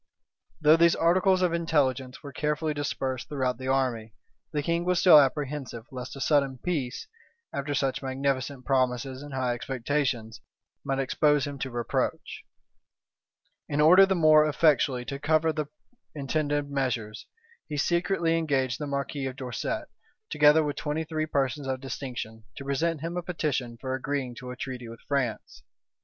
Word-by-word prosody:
Though 155 Hz, +1 st, +6 dB
these 170 Hz, 0 st, +5 dB
articles 185 Hz, +2 st, +3 dB
of 175 Hz, -2 st, +2 dB
intelligence 135 Hz, -6 st, 0 dB
were 140 Hz, -2 st, -8 dB
carefully 150 Hz, +2 st, -1 dB
dispersed 135 Hz, -3 st, -3 dB
throughout 130 Hz, -4 st, -1 dB
the 130 Hz, -, -5 dB
army, 125 Hz, -5 st, 0 dB, 0.4 s
the 150 Hz, -2 st, -1 dB
king 170 Hz, +2 st, 0 dB
was 180 Hz, 0 st, +1 dB
still 175 Hz, -5 st, +9 dB
apprehensive 135 Hz, -4 st, -1 dB
lest 130 Hz, 0 st, -7 dB
a -, -, -8 dB
sudden 140 Hz, -2 st, +2 dB
peace, 135 Hz, -5 st, -3 dB, 0.5 s
after 145 Hz, +1 st, -2 dB
such 135 Hz, 0 st, 0 dB
magnificent 135 Hz, 0 st, -2 dB
promises 130 Hz, 0 st, 0 dB
and 145 Hz, 0 st, -9 dB
high 130 Hz, -2 st, 0 dB
expectations, 125 Hz, -2 st, -2 dB, 0.4 s
might 135 Hz, -, -1 dB
expose 145 Hz, +2 st, +2 dB
him 140 Hz, -1 st, -6 dB
to 135 Hz, -, -3 dB
reproach. 120 Hz, -2 st, -2 dB, 1.3 s
In 145 Hz, -, -1 dB
order 180 Hz, +6 st, +7 dB
the 190 Hz, -, +1 dB
more 155 Hz, -2 st, +5 dB
effectually 140 Hz, -4 st, +2 dB
to 140 Hz, +1 st, -5 dB
cover 155 Hz, +2 st, +2 dB
the 155 Hz, -1 st, -3 dB, 0.5 s
intended 145 Hz, 0 st, -1 dB
measures, 120 Hz, -6 st, -2 dB, 0.4 s
he 150 Hz, -, -3 dB
secretly 170 Hz, +1 st, +1 dB
engaged 130 Hz, -5 st, 0 dB
the 150 Hz, -, -3 dB
marquis 140 Hz, 0 st, -3 dB
of 130 Hz, -, -6 dB
Dorset, 130 Hz, -3 st, -4 dB, 0.4 s
together 150 Hz, +1 st, +5 dB
with 145 Hz, -1 st, -3 dB
twenty 150 Hz, +1 st, -2 dB
three 155 Hz, -1 st, -3 dB
persons 140 Hz, -1 st, -1 dB
of 130 Hz, -1 st, -2 dB
distinction, 125 Hz, -4 st, -6 dB
to 140 Hz, -, -8 dB
present 155 Hz, +3 st, 0 dB
him 170 Hz, +2 st, -4 dB
a -, -, -1 dB
petition 145 Hz, -9 st, -2 dB
for 130 Hz, -1 st, -3 dB
agreeing 130 Hz, -1 st, -2 dB
to 125 Hz, -, -8 dB
a 125 Hz, -, -6 dB
treaty 125 Hz, -1 st, -6 dB
with 115 Hz, 0 st, -11 dB
France. 130 Hz, -, -2 dB
140 Hz, 155 wpm, -27 LUFS, 130-155 Hz, 1.3 s, still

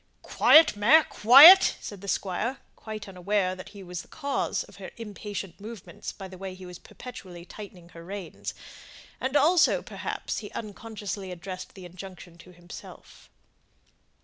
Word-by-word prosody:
"Quiet, 315 Hz, -7 st, +5 dB
mare, 240 Hz, +11 st, +5 dB
quiet," 285 Hz, -, +8 dB
said 205 Hz, -3 st, -9 dB
the 200 Hz, -, -10 dB
Squire, 205 Hz, +7 st, -2 dB, 0.2 s
totally 215 Hz, -1 st, -8 dB
unaware 190 Hz, 0 st, -1 dB
that 185 Hz, 0 st, -10 dB
he 200 Hz, -2 st, -12 dB
was 180 Hz, -1 st, -6 dB
the -, -, -18 dB
cause 280 Hz, -3 st, -3 dB
of -, -, -17 dB
her -, -, -9 dB
impatient 205 Hz, -4 st, -7 dB
movements 215 Hz, -2 st, -9 dB
by 195 Hz, -, -10 dB
the 185 Hz, -1 st, -13 dB
way 190 Hz, -1 st, -7 dB
he 185 Hz, 0 st, -12 dB
was 180 Hz, -1 st, -10 dB
perpetually 185 Hz, -8 st, -11 dB
tightening 185 Hz, -4 st, -12 dB
her 165 Hz, -1 st, -13 dB
reins; 190 Hz, 0 st, -7 dB, 0.6 s
and 260 Hz, +2 st, -3 dB
also, 325 Hz, +4 st, +3 dB
perhaps, -, -, -5 dB
he -, -, -9 dB
unconsciously 205 Hz, -3 st, -7 dB
addressed 185 Hz, +1 st, -8 dB
the 190 Hz, -2 st, -11 dB
injunction 180 Hz, -1 st, -12 dB
to 180 Hz, -, -15 dB
himself. 175 Hz, -1 st, -14 dB
195 Hz, 150 wpm, -26 LUFS, 180-225 Hz, 0.6 s, quiet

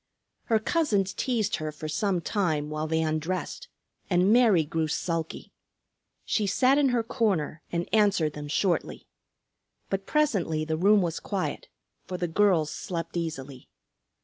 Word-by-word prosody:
Her 225 Hz, -, +3 dB
cousins 215 Hz, -, +1 dB
teased 225 Hz, -5 st, 0 dB
her 155 Hz, -1 st, -4 dB
for 150 Hz, +1 st, -7 dB
some 180 Hz, +3 st, 0 dB
time, 155 Hz, -5 st, -1 dB
while 155 Hz, +1 st, -2 dB
they 160 Hz, 0 st, +1 dB
undressed, 160 Hz, -, -3 dB, 0.4 s
and 185 Hz, +3 st, +4 dB
Mary 220 Hz, -10 st, +5 dB
grew 160 Hz, +1 st, -1 dB
sulky. 165 Hz, +1 st, -3 dB, 0.7 s
She 210 Hz, -2 st, 0 dB
sat 260 Hz, +7 st, +3 dB
in 280 Hz, -2 st, +4 dB
her 240 Hz, -2 st, +1 dB
corner 195 Hz, -, -1 dB
and 170 Hz, 0 st, -2 dB
answered 200 Hz, -8 st, +3 dB
them 150 Hz, 0 st, -7 dB
shortly. 175 Hz, +4 st, -1 dB, 0.9 s
But 195 Hz, 0 st, -2 dB
presently 190 Hz, -, +1 dB
the 160 Hz, 0 st, -1 dB
room 200 Hz, +4 st, +4 dB
was 170 Hz, -2 st, -2 dB
quiet, 200 Hz, -, -3 dB, 0.4 s
for 180 Hz, -, -4 dB
the 175 Hz, -, -1 dB
girls 170 Hz, -3 st, +2 dB
slept 170 Hz, -3 st, -5 dB
easily. 140 Hz, -6 st, -5 dB
180 Hz, 145 wpm, -27 LUFS, 155-210 Hz, 0.9 s, Mary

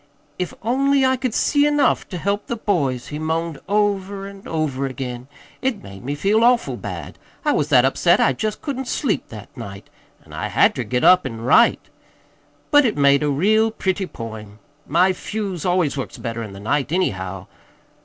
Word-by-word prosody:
"'If 180 Hz, -, -2 dB
only 270 Hz, +3 st, +2 dB
I 260 Hz, 0 st, +3 dB
could 255 Hz, -3 st, -3 dB
see 290 Hz, 0 st, +3 dB
enough 295 Hz, -1 st, +1 dB
ter 180 Hz, -, -5 dB
help 200 Hz, +4 st, -2 dB
the 235 Hz, -, -2 dB
boys!' 145 Hz, -, -1 dB
he 150 Hz, -, -5 dB
moaned 160 Hz, -1 st, -2 dB
over 200 Hz, -1 st, 0 dB
an' 200 Hz, 0 st, -12 dB
over 145 Hz, -4 st, -1 dB
again. 125 Hz, -1 st, -6 dB, 0.3 s
It 260 Hz, -5 st, -1 dB
made 100 Hz, +1 st, -11 dB
me 140 Hz, +3 st, -3 dB
feel 205 Hz, +8 st, +2 dB
awful 245 Hz, 0 st, +3 dB
bad. -, -, -7 dB, 0.3 s
I 295 Hz, -, +3 dB
was 150 Hz, -, 0 dB
that 130 Hz, -2 st, +5 dB
upset 170 Hz, +6 st, +3 dB
I 135 Hz, -, +3 dB
jest 215 Hz, +10 st, -3 dB
couldn't 265 Hz, -3 st, -4 dB
sleep 250 Hz, -4 st, -1 dB
that 105 Hz, -3 st, -11 dB
night, 100 Hz, 0 st, -9 dB, 0.3 s
an' -, -, -15 dB
I -, -, -3 dB
had -, -, +3 dB
ter -, -, -3 dB
get 125 Hz, 0 st, -1 dB
up 180 Hz, 0 st, +6 dB
an' 115 Hz, -4 st, -6 dB
write. 130 Hz, -, +4 dB, 0.8 s
But 290 Hz, -1 st, +7 dB
it 230 Hz, -, 0 dB
made 140 Hz, 0 st, +4 dB
a 150 Hz, -, +1 dB
real 215 Hz, +10 st, +3 dB
pretty 190 Hz, -3 st, -2 dB
poem. 110 Hz, -5 st, -9 dB, 0.3 s
My 180 Hz, +5 st, +3 dB
fuse 195 Hz, -3 st, -4 dB
always 175 Hz, -6 st, +1 dB
works 135 Hz, -, -5 dB
better 115 Hz, -1 st, -4 dB
in 105 Hz, -3 st, -7 dB
the 100 Hz, -, -10 dB
night, 135 Hz, +7 st, -1 dB
anyhow. 95 Hz, -, -2 dB
175 Hz, 185 wpm, -21 LUFS, 130-215 Hz, 0.8 s, But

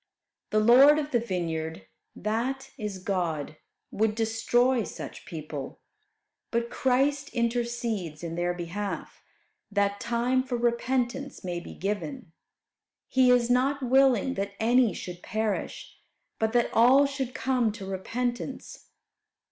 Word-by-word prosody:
The 215 Hz, -, 0 dB
Lord 260 Hz, +7 st, +7 dB
of 300 Hz, -1 st, -2 dB
the 240 Hz, -, +3 dB
vineyard, 165 Hz, -, -3 dB, 0.3 s
that 260 Hz, +5 st, -2 dB
is, 210 Hz, -6 st, -5 dB
God, 170 Hz, -6 st, -2 dB, 0.3 s
would 215 Hz, 0 st, +1 dB
destroy 230 Hz, +2 st, +2 dB
such -, -, -8 dB
people, 150 Hz, -4 st, -6 dB, 0.7 s
but 235 Hz, 0 st, -1 dB
Christ 275 Hz, +2 st, +1 dB
intercedes 235 Hz, -8 st, -2 dB
in 165 Hz, -1 st, -4 dB
their 175 Hz, +1 st, -1 dB
behalf, 180 Hz, +4 st, -5 dB, 0.5 s
that 200 Hz, 0 st, +1 dB
time 240 Hz, +2 st, +1 dB
for 255 Hz, -2 st, -3 dB
repentance 240 Hz, +3 st, -1 dB
may 175 Hz, -2 st, -3 dB
be 175 Hz, -, -10 dB
given. 210 Hz, -, -4 dB, 0.8 s
"He 260 Hz, -1 st, +4 dB
is 245 Hz, -1 st, +4 dB
not 270 Hz, +3 st, +2 dB
willing 265 Hz, -1 st, +4 dB
that 200 Hz, -2 st, -3 dB
any 235 Hz, 0 st, +4 dB
should 180 Hz, -1 st, -7 dB
perish, 215 Hz, 0 st, -3 dB, 0.4 s
but 220 Hz, 0 st, +1 dB
that 240 Hz, -1 st, +2 dB
all 255 Hz, +5 st, +6 dB
should 275 Hz, -3 st, -3 dB
come 250 Hz, -4 st, +1 dB
to 205 Hz, -3 st, -8 dB
repentance." 240 Hz, +6 st, -4 dB
235 Hz, 125 wpm, -27 LUFS, 195-255 Hz, 0.8 s, Lord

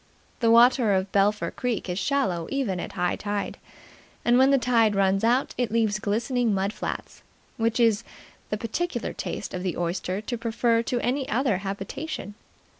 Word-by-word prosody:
The 230 Hz, -, +3 dB
water 235 Hz, -1 st, +6 dB
of 190 Hz, 0 st, 0 dB
Belpher 205 Hz, +1 st, +2 dB
Creek 245 Hz, -6 st, -2 dB
is 180 Hz, +1 st, -2 dB
shallow 195 Hz, -, 0 dB
even 245 Hz, -10 st, -1 dB
at -, -, -6 dB
high 180 Hz, -1 st, 0 dB
tide, 205 Hz, -1 st, -3 dB, 0.7 s
and 240 Hz, +1 st, +5 dB
when 265 Hz, +1 st, +6 dB
the 275 Hz, -, +5 dB
tide 230 Hz, -4 st, +3 dB
runs 195 Hz, 0 st, +2 dB
out 245 Hz, +4 st, +2 dB
it 245 Hz, -3 st, +1 dB
leaves 220 Hz, -2 st, +1 dB
glistening 225 Hz, +1 st, 0 dB
mud 195 Hz, +2 st, -1 dB
flats, -, -, -6 dB, 0.4 s
which 230 Hz, +1 st, 0 dB
it -, -, +5 dB
is 225 Hz, -2 st, +3 dB, 0.5 s
the 210 Hz, -, -1 dB
peculiar 240 Hz, +4 st, -3 dB
taste -, -, -5 dB
of 180 Hz, -, -3 dB
the 180 Hz, -2 st, -2 dB
oyster 175 Hz, +2 st, -2 dB
to 240 Hz, +3 st, -4 dB
prefer 230 Hz, 0 st, +1 dB
to 240 Hz, +1 st, -1 dB
any 265 Hz, +2 st, -1 dB
other 240 Hz, -3 st, +1 dB
habitation. 200 Hz, +5 st, -5 dB
225 Hz, 175 wpm, -26 LUFS, 195-245 Hz, 0.7 s, water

